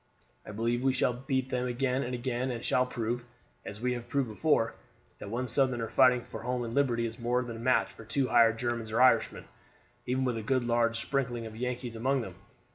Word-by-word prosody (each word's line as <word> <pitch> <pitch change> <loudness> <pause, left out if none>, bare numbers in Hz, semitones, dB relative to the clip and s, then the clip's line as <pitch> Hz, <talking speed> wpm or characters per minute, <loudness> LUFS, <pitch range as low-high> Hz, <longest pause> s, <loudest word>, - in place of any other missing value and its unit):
I - - -6
believe 115 +3 -1
we 135 0 +2
shall 125 -1 +1
beat 130 +1 -2
them 125 -1 -1
again 125 +1 0
and 125 -1 -3
again, 125 +1 -2
and 120 -2 -4
shall 125 0 +2
prove, 120 0 -3 0.4
as 105 - -7
we 125 +2 0
have 120 -1 -6
proved 135 -3 0
before, 115 0 +1 0.5
that - - -7
one 125 +4 -2
Southerner 125 -2 +1
fighting 125 -2 +4
for - - -8
home 125 +1 -2
and 115 -1 -5
liberty 120 -4 +2
is 115 +1 -6
more 120 +1 +1
than 115 -2 -6
a - - -9
match 115 -5 +2
for - - -12
two 130 +4 0
hired 115 -2 +5
Germans 120 -2 -2
or 115 - 0
Irishmen, 130 0 +3 0.6
even 130 +1 0
with 125 -2 0
a - - -3
good 130 +3 +1
large 115 -1 +1
sprinkling 120 -2 -2
of 110 -1 -8
Yankees 125 0 -4
among 130 +4 +1
them. - - -7
120 Hz, 215 wpm, -30 LUFS, 115-130 Hz, 0.6 s, hired